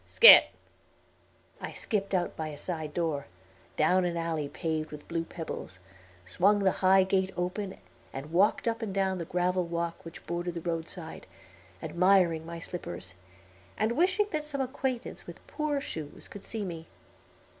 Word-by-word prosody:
Scat." 470 - +10 1.1
I - - -5
skipped 200 -3 -1
out 175 -1 0
by 160 - -3
a 150 -1 -7
side 160 -3 -4
door, 155 -4 -1 0.5
down 180 +4 +4
an 175 -1 -1
alley 160 -3 -2
paved 155 0 -2
with 150 -1 -10
blue 165 -1 -1
pebbles, 165 - -7 0.5
swung 195 - +3
the 195 -2 +3
high 190 0 +6
gate 190 0 +1
open, 185 +2 -3 0.3
and 135 +3 -7
walked 195 +7 +3
up 230 +1 0
and 220 -3 -3
down 190 -1 +1
the 170 - -3
gravel 180 +2 +1
walk 170 0 -3
which 165 0 -11
bordered 175 0 -3
the 170 - -4
roadside, 165 0 -5 0.6
admiring 175 -3 +3
my 170 0 -6
slippers, 90 - -7 0.6
and 215 +1 +1
wishing 375 - +3
that 310 -1 -1
some 300 -2 -5
acquaintance 260 -1 -3
with - - -11
poor 300 -2 -1
shoes 155 - -7
could 205 - -10
see 220 -3 -4
me. 165 -3 -6
175 Hz, 155 wpm, -29 LUFS, 165-200 Hz, 1.1 s, Scat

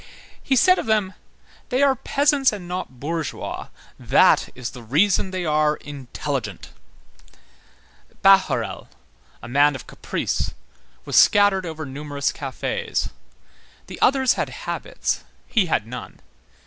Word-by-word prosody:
He 270 - +1
said 365 +8 +5
of - - -4
them: 210 -4 +1 0.6
"They 260 +1 +2
are 275 -1 +5
peasants 280 +2 +2
and 195 -4 -7
not 180 -8 -5
bourgeois; 160 +1 -4 0.3
that - - +4
is 125 -2 -5
the 125 - -10
reason 175 - +2
they 185 -1 -3
are 150 -1 +2
intelligent." 140 - -6 1.5
Bahorel, 190 - +3 0.6
a - - -7
man 145 +3 +3
of 130 - -8
caprice, - - -3 0.5
was - - -3
scattered 205 -3 +5
over 160 -1 -6
numerous 140 +1 -3
cafés; 480 -2 -3 0.7
the - - -10
others 265 -1 +4
had - - -2
habits, - - -3 0.2
he 210 -6 +1
had 110 - 0
none. 125 +2 -9
180 Hz, 120 wpm, -22 LUFS, 140-220 Hz, 1.5 s, said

